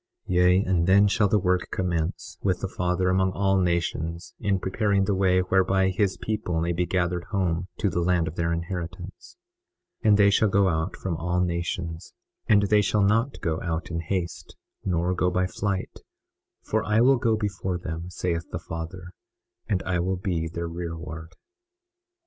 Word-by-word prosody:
21:28 90 - -1
Yea, 90 +2 +5
and 90 -2 +1
then 100 +2 +6
shall 100 +1 +3
the 105 - +3
work 90 -2 +1
commence, 85 -3 -3
with - - 0
the - - -1
Father 90 +1 0
among 95 0 +2
all 95 -1 +2
nations 85 -2 -1
in 100 -2 +1
preparing 100 +1 +1
the 100 - +1
way 95 -1 +3
whereby 95 +1 +2
his 95 0 0
people 105 -6 -2
may 85 +1 0
be 85 +1 -1
gathered 90 -1 0
home 90 -2 -1
to - - 0
the 90 -2 0
land 85 -1 +2
of - - -4
their 85 0 -1
inheritance. 90 - -6 0.7
21:29 110 - +4
And 105 - +6
they 100 -1 +6
shall 105 +1 +3
go 95 0 +3
out 80 +2 -1
from 85 -4 -3
all 90 +2 -1
nations; 85 -1 -3 0.3
and 105 -3 +5
they 105 +1 +4
shall 105 0 +2
not 115 +7 +1
go 80 -1 -1
out 85 0 -3
in 85 - -2
haste, 85 +1 -4 0.3
nor 90 -1 0
go 90 0 +1
by 90 +1 +1
flight, 95 +1 -3 0.6
for 110 +1 0
I 105 +1 +2
will 135 +2 +5
go 115 -3 +1
before 95 -3 -2
them, 85 0 -6
saith 85 -2 -3
the - - -4
Father, 85 +2 -7 0.6
and 90 -5 0
I 90 -2 0
will 95 +2 0
be 90 -3 -2
their 85 +1 -4
rearward. 85 -1 -6
90 Hz, 180 wpm, -26 LUFS, 85-95 Hz, 0.7 s, then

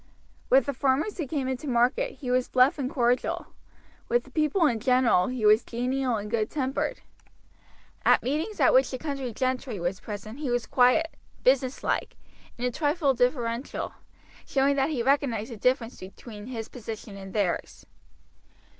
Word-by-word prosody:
With 265 -1 +5
the 280 - -2
farmers 280 - 0
who 310 - -2
came 275 -2 -2
into 260 +3 -3
market 255 - +1
he 250 -4 -5
was 250 0 +2
bluff 255 +3 +3
and 260 -2 -1
cordial; 245 -1 0 0.6
with 485 - +2
the - - -17
people 310 +3 +2
in 235 -7 +2
general 250 -6 +3
he 250 -4 -2
was 215 +2 +6
genial 250 +1 -1
and 210 -1 -4
good 220 -2 0
tempered. 270 -2 -2 1.0
At - - +4
meetings 315 - -2
at - - +5
which - - +5
the 260 - -4
county 275 -3 -4
gentry 255 -2 -2
were 175 +2 0
present 215 +4 -7
he 295 -4 -3
was 245 -1 0
quiet, 255 +6 +3 0.3
businesslike, 260 0 +1 0.4
and 245 - -2
a 250 - +1
trifle 295 +1 +1
deferential, 245 0 -1 0.5
showing 275 +1 +2
that 275 +1 +1
he 265 -7 -1
recognized 255 -4 +1
the 230 - -7
difference 250 +1 0
between 205 +3 -10
his 225 -3 -5
position 225 -3 -8
and 195 -1 -9
theirs. 200 -5 -2
255 Hz, 165 wpm, -27 LUFS, 230-280 Hz, 1.0 s, was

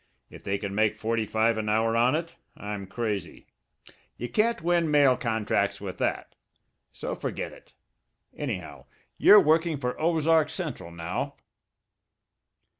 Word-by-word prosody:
If - - -12
they 100 0 -1
can 100 -1 -5
make 105 +1 +2
forty 115 -1 -1
five 110 +1 +1
an 105 -1 -2
hour 115 +1 +2
on 120 +4 +3
it, 165 +1 -4 0.2
I'm 105 -2 -6
crazy. 100 -5 -4 0.7
You 120 - -5
can't 215 - +1
win 170 -1 +2
mail 145 -3 +5
contracts 105 -4 -1
with 95 -2 -7
that. - - -2 0.6
So - - -5
forget - - -4
it. - - -18 0.6
Anyhow, - - -5 0.3
you're 210 - +9
working 160 -1 +2
for 125 -2 -2
the - - -16
Ozark 160 -1 +3
Central 150 - -5
now." 85 +1 -4
115 Hz, 140 wpm, -27 LUFS, 105-155 Hz, 0.7 s, you're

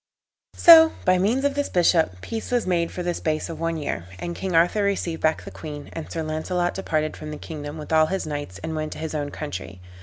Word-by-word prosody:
So, 320 -1 +9
by 185 0 +4
means 235 +9 +1
of 285 - +2
this 285 0 -1
bishop, 165 - +2
peace 225 -1 -5
was 245 -1 +1
made 170 -2 0
for 180 - -5
the 175 0 0
space 155 -1 -2
of 165 - -8
one 165 0 -1
year; 145 - -3
and 170 - -5
King 190 -3 -3
Arthur 175 +6 +4
received 195 -5 -1
back 155 0 +1
the - - -9
queen, 150 -2 -8
and 165 - -7
Sir 165 - -3
Launcelot 175 +3 -1
departed 155 -5 -1
from 155 - -8
the 150 - -6
kingdom 150 -1 -7
with 155 +1 -6
all 155 0 +5
his 190 +3 -2
knights, 145 -11 -5
and 160 0 -3
went 155 0 -3
to - - -10
his 160 0 -5
own 145 -2 -2
country. 95 - -6
160 Hz, 235 wpm, -24 LUFS, 155-185 Hz, -, So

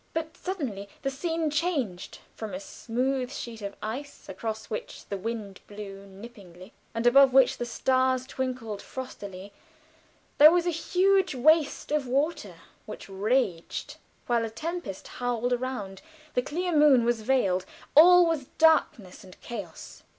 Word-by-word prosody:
But 320 -1 -3
suddenly 255 - -5
the 270 - 0
scene 325 +2 -2
changed; 285 - -2 0.2
from 220 +4 -6
a - - -4
smooth 260 -2 -2
sheet 235 -5 -7
of 200 0 -6
ice, 260 +7 -6
across 220 +3 -5
which 215 - -7
the 200 - -4
wind 205 -1 -5
blew 200 -1 -9
nippingly, 195 -2 -13 0.2
and 230 +1 -2
above 265 +1 +6
which 265 -1 +5
the 240 - -3
stars 255 +1 +1
twinkled 255 -6 -4
frostily, 200 -6 -8 0.9
there 300 +1 +11
was 350 0 +2
a 350 - +1
huge 370 +1 +2
waste 300 +3 +3
of 300 -3 0
water 265 - -1 0.3
which 215 - -9
raged, 200 -3 -1 0.3
while 235 -1 +1
a 225 - -3
tempest 315 - -6
howled 245 0 -2
around 240 -6 -4 0.3
the 250 - +2
clear 345 +6 -2
moon 290 -5 +6
was 235 -2 +1
veiled, 195 -7 +1 0.3
all 355 +3 +8
was 325 -5 -1
darkness 315 - +2
and 185 -1 -15
chaos. 200 -9 -8
245 Hz, 145 wpm, -27 LUFS, 205-295 Hz, 0.9 s, there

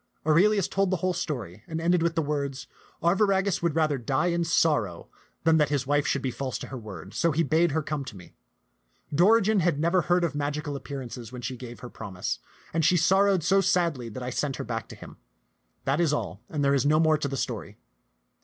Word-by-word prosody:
Aurelius 185 +5 +4
told 195 -1 +1
the 185 - +1
whole 185 - +2
story, 110 - -4
and 160 0 -4
ended 170 +1 +2
with 165 0 0
the 160 - +1
words, 140 -2 -3 0.4
"Arviragus 195 +1 +2
would 170 -3 0
rather 155 -4 +1
die 130 +8 0
in 170 0 +1
sorrow 150 - +1 0.3
than 160 0 +4
that 150 -2 +3
his 140 -2 0
wife 145 +1 +1
should 140 - 0
be 130 - -1
false 130 0 -4
to - - -8
her 135 - -6
word; 100 -3 -9
so 170 - +2
he 160 +3 +1
bade 165 +2 +3
her 160 0 0
come 145 -1 -3
to 105 - -9
me. 90 - -14 0.8
Dorigen 210 +5 +4
had 170 -4 +1
never 170 +3 +3
heard 175 +1 +2
of 170 - 0
magical 145 0 -3
appearances 130 -4 -7
when 125 -1 -8
she 125 +2 -3
gave 120 -1 -10
her 125 - -7
promise, 90 - -4 0.3
and 165 0 +1
she 175 +4 +4
sor 190 +4 +4
rowed 195 -5 +2
so 195 +4 +4
sadly 170 -10 +1
that 125 +4 -7
I 125 - -3
sent 135 +1 -1
her - - -5
back 115 -2 -4
to - - -10
him. - - -12 0.7
That 135 +3 +1
is 165 -4 +2
all; 105 -6 -3
there 140 -2 +1
is 135 -3 +2
no 150 +2 +3
more 155 -2 +3
to 145 - -1
the 135 0 -4
story." - - -4
150 Hz, 220 wpm, -27 LUFS, 130-170 Hz, 0.8 s, Aurelius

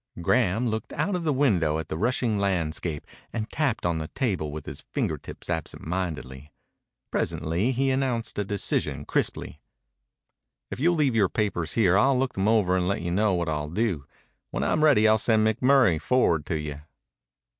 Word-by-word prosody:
Graham 115 +5 +2
looked 110 -1 -3
out 205 - -1
of 180 -2 -1
the 155 - +2
window 95 - +2
at 80 -1 -4
the 80 - -4
rushing 115 +2 0
landscape 85 -5 -1 0.3
and 110 -2 -3
tapped 135 - -1
on 85 -2 0
the 80 - -4
table 95 - -2
with 75 0 -7
his - - -6
finger - - -2
tips - - -10
absentmindedly. 80 -5 -4 0.6
Presently 85 +10 0
he 135 +1 +1
announced 125 -5 -1
a - - +1
decision 100 0 -2
crisply. - - -2 1.1
"If - - -5
you'll 170 +5 +3
leave 145 -5 +2
your 105 -5 +3
papers 90 -7 -1
here 100 -3 +4
I'll 135 +2 +4
look 130 0 0
them 95 +1 0
over 105 -5 +3
and 90 -1 +1
let 100 -2 -1
you 85 - -2
know 100 +1 +2
what 85 -1 -1
I'll 75 -1 -2
do. 90 -6 -1 0.4
When - - -2
I'm 155 - +1
ready 135 -8 +5
I'll 110 0 +4
send 110 -1 +3
McMurray 120 - +3
forward 85 - +2
to 80 - -1
you." 75 -1 -6
100 Hz, 175 wpm, -26 LUFS, 80-125 Hz, 1.1 s, ready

